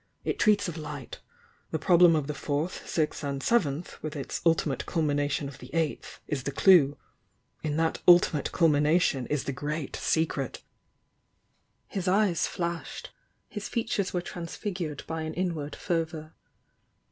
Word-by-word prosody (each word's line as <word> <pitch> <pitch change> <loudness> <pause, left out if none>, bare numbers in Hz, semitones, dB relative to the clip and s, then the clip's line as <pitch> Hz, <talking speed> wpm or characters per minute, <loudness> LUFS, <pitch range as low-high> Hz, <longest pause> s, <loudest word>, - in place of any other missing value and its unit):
It - - -2
treats 205 -2 +4
of 170 -1 -5
Light. 150 -4 -7 0.5
'The - - -1
prob 175 +2 +3
lem 170 -2 +8
of 150 -3 0
the 150 - -3
Fourth, 145 +5 -3
Sixth 155 -2 -1
and 140 -1 -3
Seventh,' 170 -9 0
with 155 0 -5
its 140 - -4
'ulti 165 -1 +2
mate 140 -4 -3
culmination 145 -3 0
of 140 0 -10
the - - -11
Eighth' 160 -2 -2
is 145 -3 -2
the 140 - -3
clue. 145 -3 +5 0.6
In 150 -1 -2
that 160 0 0
'ultimate 175 -4 +5
culmination' 150 -4 +3
is 150 -2 -1
the - - -2
Great 145 +2 -4
Secret!" 155 -5 -1 1.2
His 190 -2 -4
eyes 190 -2 +3
flashed, 170 -1 -4 0.2
— - - -45
his 210 - -4
features 225 -4 -1
were 180 - -1
transfigured 170 -2 -5
by 160 0 -4
an 160 0 -4
inward 165 -5 -2
fervour. 160 -2 -3
160 Hz, 155 wpm, -28 LUFS, 145-175 Hz, 1.2 s, lem